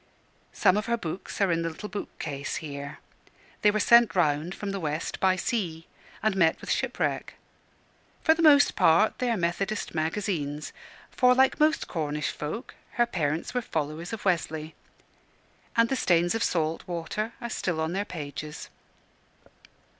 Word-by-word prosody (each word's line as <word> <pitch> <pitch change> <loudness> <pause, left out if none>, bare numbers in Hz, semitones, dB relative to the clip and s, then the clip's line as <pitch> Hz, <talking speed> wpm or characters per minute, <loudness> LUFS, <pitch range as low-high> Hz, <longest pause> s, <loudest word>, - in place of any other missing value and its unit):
Some 185 - +3
of 210 +2 -2
her 235 0 +1
books 175 -2 -6
are 195 -3 +3
in 165 0 +1
the 165 - -1
little 165 +6 -7
bookcase 145 -8 -5
here. 140 -2 -6 0.6
They 210 - +6
were 215 +1 +1
sent 235 0 +6
round 155 0 +1
from 205 -1 -4
the 195 - -3
West 155 -1 -3
by 190 -1 +3
sea, 175 -7 -2 0.4
and 215 -2 +2
met 165 -4 +3
with - - -5
shipwreck. - - -1 0.9
For 320 - +6
the 330 - -2
most 290 -3 +6
part 165 +7 +4
they 250 - 0
are 230 - +1
Methodist 195 +4 -2
Magazines 160 -3 -2 0.4
for, 250 0 +4
like 265 +1 +3
most 305 +1 +3
Cornish 150 -3 -2
folk, 155 - -6 0.2
her 240 - +3
parents 160 -8 -2
were 250 - 0
followers 160 -3 -3
of 225 -2 -6
Wesley 160 -3 -1 1.0
and 230 0 +5
the 270 - 0
stains 175 -6 +2
of 225 - -2
the - - +3
salt 160 -1 -1
water 180 +6 -3
are 235 -1 -5
still 175 -6 -2
on 160 +2 -1
their 195 +2 0
pages. 150 -4 -7
175 Hz, 160 wpm, -27 LUFS, 160-215 Hz, 1.0 s, They